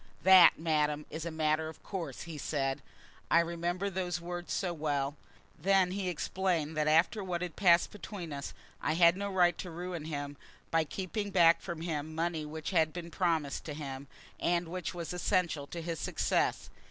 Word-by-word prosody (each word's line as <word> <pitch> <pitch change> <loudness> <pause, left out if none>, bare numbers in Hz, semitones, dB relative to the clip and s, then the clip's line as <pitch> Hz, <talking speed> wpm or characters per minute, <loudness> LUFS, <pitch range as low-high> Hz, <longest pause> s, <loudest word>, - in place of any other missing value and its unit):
"That, 185 -2 +8
madam, 150 -2 0
is 160 +1 -5
a - - -1
matter 155 0 0
of 160 - -13
course," 190 -4 -5
he 165 -3 -7
said. 135 -3 -1 0.5
I 170 - +6
remember 170 +3 -1
those 180 -2 -2
words 175 0 -6
so 180 -3 -1
well. 145 -3 -1 0.4
Then 190 +1 +3
he 190 -1 -2
explained 175 -2 -1
that 155 0 +1
after 165 +7 +3
what 180 -2 -2
had 175 -2 -5
passed 175 -3 +4
between 195 -6 -7
us, 140 0 -6 0.3
I - - +1
had 170 +1 +6
no 200 +1 -3
right 175 -2 +4
to 180 - -5
ruin 175 -1 -5
him 145 -2 -5 0.3
by 165 -1 +3
keeping 200 +6 -4
back 170 -3 +5
from 170 -3 -5
him 160 -2 -3
money 165 -1 -1
which 155 +3 -5
had 160 -4 +3
been 170 -1 -7
promised 160 -5 0
to 150 - -5
him, 140 -2 -6 0.3
and 170 -1 0
which 180 0 -4
was 170 0 -4
essential 175 -5 0
to 170 +1 -6
his 165 -1 -3
success. - - 0
170 Hz, 180 wpm, -31 LUFS, 155-180 Hz, 0.5 s, That